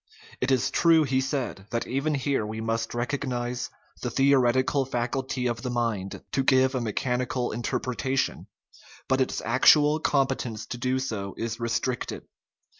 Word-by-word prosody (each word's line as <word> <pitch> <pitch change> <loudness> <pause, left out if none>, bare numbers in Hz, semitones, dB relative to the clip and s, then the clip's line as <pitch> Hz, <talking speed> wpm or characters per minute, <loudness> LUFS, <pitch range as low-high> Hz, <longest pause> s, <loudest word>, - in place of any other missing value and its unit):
It 125 - 0
is 130 -3 +2
true, 165 -2 +5
he 130 -2 +1
said, 130 -8 -3
that 115 - -2
even 140 +4 -1
here 140 -3 0
we 110 +1 -5
must 115 +1 -2
recognize 125 -1 -2 0.3
the 125 - -2
theoretical 135 +1 +3
faculty 125 0 -2
of 120 -1 -1
the 125 - -3
mind 115 -6 -2
to 135 - +1
give 130 0 +4
a 130 - -1
mechanical 125 +2 -1
interpretation, 125 +3 -2 0.6
but 130 0 +2
its 130 - -1
actual 150 +5 +5
competence 135 -7 0
to 120 - -6
do 130 +1 0
so 110 -7 -4
is 115 +1 -3
restricted. 120 +2 -2
125 Hz, 145 wpm, -26 LUFS, 120-135 Hz, 0.6 s, true